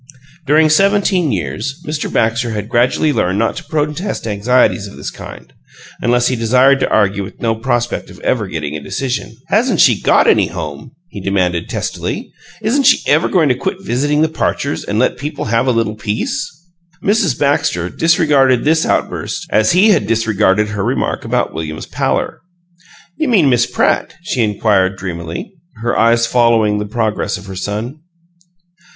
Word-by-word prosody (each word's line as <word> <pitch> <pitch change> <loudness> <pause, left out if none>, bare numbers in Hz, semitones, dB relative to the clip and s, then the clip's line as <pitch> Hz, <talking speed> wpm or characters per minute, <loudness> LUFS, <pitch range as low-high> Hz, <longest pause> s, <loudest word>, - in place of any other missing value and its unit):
During 155 +2 +5
seventeen 195 -3 +2
years 110 +7 -3
Mr. 150 0 -3
Baxter 115 +2 +1
had 105 0 -4
gradually 125 +6 +2
learned 95 -4 0
not 115 +1 0
to - - -6
protest 150 - -3
anxieties 110 0 +1
of 100 - -12
this - - -6
kind, - - -11 0.5
unless 120 0 +2
he 130 - 0
desired 125 +4 +3
to - - 0
argue 100 -1 +1
with 95 - -11
no 115 -1 0
prospect 120 +1 -2
of - - -13
ever - - 0
getting 75 -2 -4
a 75 - -5
decision. 120 - -4
"Hasn't 220 -2 +2
she 125 -11 +4
got - - +4
any - - +4
HOME?" 80 -4 -7 0.2
he 100 - -8
demanded, 90 -3 -1
testily. - - -4 0.3
"Isn't 270 +5 +1
she - - +3
ever 155 +4 +3
going 170 -5 +3
to - - +4
quit 185 +9 -3
visiting 145 +1 +1
the - - +3
Parchers 145 -2 -2
and 105 - -3
let 130 - +1
people 150 +1 -4
have 115 +3 +1
a - - +4
little 115 -2 0
peace?" 110 - -3 0.5
Mrs. 200 - +1
Baxter 115 -11 0
disregarded 145 - +2
this 160 +2 +2
outburst - - -2
as 110 +5 +3
he 190 +5 +5
had 155 - +2
disregarded 105 -2 +1
her 105 -2 -3
remark - - -1
about - - -1
William's 80 -1 -5
pallor. - - -2 0.8
"You 315 - 0
mean 185 - +4
Miss 120 -1 +2
Pratt?" - - 0
she 130 -8 -1
inquired, 100 -3 +1
dreamily, 85 - -6 0.3
her 120 - 0
eyes 115 +1 +3
following 115 -4 +2
the 105 - -3
progress 110 0 -2
of 90 - -12
her 95 -1 -8
son. 105 +9 -4
120 Hz, 170 wpm, -16 LUFS, 105-150 Hz, 0.8 s, During